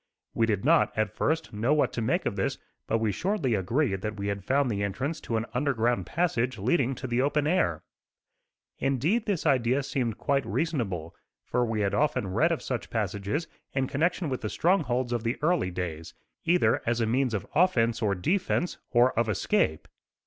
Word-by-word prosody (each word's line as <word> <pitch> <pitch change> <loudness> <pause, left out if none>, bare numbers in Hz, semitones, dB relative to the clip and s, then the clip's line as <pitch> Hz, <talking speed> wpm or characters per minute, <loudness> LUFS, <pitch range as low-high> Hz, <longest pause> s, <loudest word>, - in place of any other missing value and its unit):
We 115 - +2
did 105 0 -1
not, 160 -5 +3
at 110 -1 0
first, 160 +5 -1
know 115 +8 +2
what 150 - +1
to 115 - -2
make 155 +12 0
of - - -1
this, 95 - -1 0.3
but 115 - +2
we 110 -2 0
shortly 170 - 0
agreed 100 +1 0
that 105 0 -4
we 100 0 -2
had 100 -1 -3
found 140 +4 +2
the 100 -1 -2
entrance 130 - -2
to 115 - -2
an 110 - -1
underground 125 -3 0
passage 130 -8 0
leading 130 - +1
to 130 - -7
the 120 0 +1
open 145 +2 +1
air. 85 - +1 1.0
Indeed 155 - +1
this 195 -7 -1
idea 130 -1 +2
seemed 125 -5 -2
quite 140 -1 +1
reasonable, 100 - -2 0.3
for 125 - 0
we 110 -2 -1
had 100 -1 0
often 120 -10 0
read 160 - +3
of 165 - -2
such 125 -3 -3
passages 105 - -2 0.3
in 135 -1 +1
connection 165 +6 0
with 130 -3 -3
the 105 - -3
strongholds 130 - +1
of 120 - 0
the 115 +2 -1
early 165 - +2
days; 85 -3 -5 0.3
either 170 -10 +3
as 120 0 +1
a 115 - +2
means 125 +1 +1
of 100 - -3
offence 120 -10 +3
or 100 -3 +1
defence, 175 - 0
or 125 +1 +4
of 115 -1 +1
escape. 80 -5 0
120 Hz, 190 wpm, -28 LUFS, 105-150 Hz, 1.0 s, or